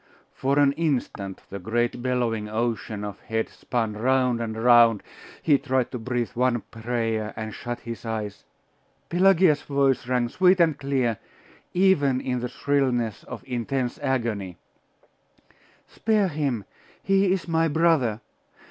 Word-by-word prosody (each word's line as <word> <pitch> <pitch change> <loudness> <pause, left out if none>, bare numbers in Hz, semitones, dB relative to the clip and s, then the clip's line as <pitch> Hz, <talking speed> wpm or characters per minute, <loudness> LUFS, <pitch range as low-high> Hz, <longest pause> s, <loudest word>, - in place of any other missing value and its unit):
For 135 +2 0
an 145 -1 +5
instant 130 - -2
the 100 - -5
great 120 +5 -1
bellowing 120 -4 -1
ocean 110 -2 -2
of 105 -1 -6
heads 110 0 -3
spun 115 -3 -2
round 125 +1 +1
and 110 -1 -4
round. 115 -2 +5 0.4
He 145 -4 +4
tried 130 -1 0
to 125 - -4
breathe 120 0 -2
one 125 -1 +1
prayer, 115 -2 -2
and 110 -1 -5
shut 120 0 -6
his 115 -1 -7
eyes 110 -3 -4 0.7
Pelagia's 180 -4 +4
voice 140 -3 +1
rang 125 -1 +1
sweet 185 +6 +4
and 165 -3 +4
clear, 130 -5 -1 0.6
even 150 -9 +3
in 125 -1 -2
the 125 0 -3
shrillness 125 -7 0
of - - -8
intense 125 0 -2
agony 115 - -2 1.3
'Spare 215 -3 +1
him! 140 - -2 0.4
He 195 -1 +3
is 185 -2 -1
my 165 0 +2
brother! 150 -8 +2
125 Hz, 135 wpm, -25 LUFS, 115-145 Hz, 1.3 s, an